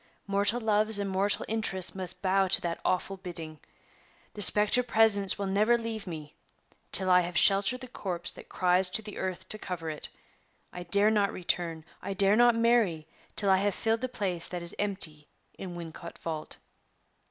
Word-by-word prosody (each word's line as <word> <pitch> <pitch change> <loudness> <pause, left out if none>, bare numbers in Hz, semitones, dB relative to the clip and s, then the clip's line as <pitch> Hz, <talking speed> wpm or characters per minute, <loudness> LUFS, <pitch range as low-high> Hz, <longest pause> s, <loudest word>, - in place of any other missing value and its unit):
Mortal 200 +4 +1
loves 215 -1 +2
and 200 0 -2
mortal 195 +1 0
interests 210 -5 0
must 185 -1 -4
bow 190 0 +2
to 185 - +4
that 170 -1 -4
awful 190 +1 -2
bidding. 165 -4 -7 0.7
The 210 - -7
specter 210 +4 +7
presence 220 -5 +3
will 200 - -4
never 210 +5 +2
leave 225 -3 -6
me 155 -4 -8 0.6
till 185 -1 +2
I 180 0 +5
have 175 -1 -4
sheltered 200 +6 +4
the 255 - -8
corpse 180 -7 -3
that - - -14
cries 180 0 +2
to 220 +4 -3
the 210 -1 -9
earth 185 0 -5
to 215 - -2
cover 165 -5 -5
it! 150 - -8 0.6
I 180 - -7
dare 200 +5 +3
not 205 -2 +1
return 170 -3 -3 0.2
I 195 - -5
dare 195 +2 +3
not 240 0 +4
marry 230 -9 +1 0.3
till 200 -2 +1
I 190 - +4
have 200 0 -1
filled 225 0 -1
the 255 - -3
place 185 -7 -3
that 175 -1 -6
is 170 - -1
empty 170 -7 -2 0.3
in 180 -2 -7
Wincot 170 0 -9
vault." 160 -2 -7
195 Hz, 180 wpm, -28 LUFS, 175-210 Hz, 0.7 s, specter